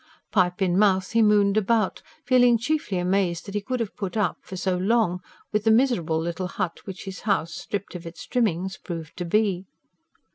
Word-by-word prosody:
Pipe 180 -1 +2
in 180 0 +2
mouth 190 -3 +3
he 230 - +3
mooned 210 -1 +4
about, 215 -1 +1 0.2
feeling 245 -2 +5
chiefly 240 -5 -1
amazed 180 -1 0
that 200 - -8
he 205 - -1
could 255 +4 -3
have 225 -4 -3
put 195 +1 -4
up, 200 -6 +1
for 185 - -8
so 185 0 0
long, 185 -1 +1 0.3
with 210 0 +1
the 220 - +3
miserable 220 -10 +3
little 170 +2 -3
hut 185 -2 -3
which 195 0 -7
his 190 -1 -6
house, 180 -6 0
stripped 200 +3 -5
of 175 -2 -7
its 165 - -9
trimmings, 190 -6 0
proved 165 -3 -7
to 175 - -3
be. 195 0 +1
195 Hz, 190 wpm, -25 LUFS, 180-215 Hz, 0.3 s, feeling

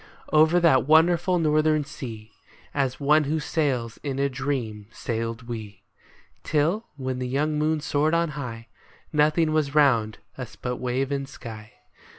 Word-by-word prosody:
Over 160 +3 +5
that 150 -7 +4
wonderful 170 +3 +4
northern 155 -2 +2
sea. 115 -7 -8 0.4
As 135 -2 -1
one 150 +2 +4
who 155 +3 0
sails 130 -8 -1
in 140 -2 -3
a 140 0 +1
dream, 130 -6 -3
sailed 115 0 -4
we, 110 -4 -7 0.6
Till, 165 +9 0
when 130 -2 -3
the 125 - -2
young 150 +4 0
moon 155 0 +1
soared 150 +2 +1
on 170 -1 +1
high, 125 -6 -6 0.5
Nothing 155 +2 +3
was 150 -2 0
round 120 -8 +3 0.2
us 125 -2 -7
but 125 -1 -4
wave 130 +2 -1
and 140 -1 -2
sky. 110 -5 -10
140 Hz, 150 wpm, -25 LUFS, 125-155 Hz, 0.6 s, Over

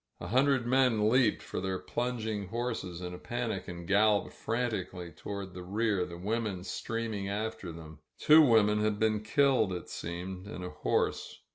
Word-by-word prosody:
A 85 - -6
himdred 130 +1 +3
men 120 -4 +3
leaped 125 -4 +3
for - - -4
their 95 0 -1
plunging 110 -3 -3
horses 115 -5 -3
in 90 0 -5
a 90 - -8
panic 120 -5 -3
and 85 -1 -7
galloped 105 +1 +3
frantically 105 -7 -3
toward 100 -1 -6
the 90 - -7
rear, 100 0 0
the 85 - -8
women 105 -1 -2
stream 115 +3 -3
ing 100 -1 -3
after 105 -3 -3
them. 80 -1 -11 0.2
Two 155 +1 +7
women 110 -6 +5
had 105 -1 +1
been 110 0 +2
killed, 125 -2 +3
it 90 -1 -5
seemed, 90 +3 -6
and 90 -3 -6
a 90 - -6
horse. - - -1
105 Hz, 170 wpm, -31 LUFS, 90-115 Hz, 0.2 s, Two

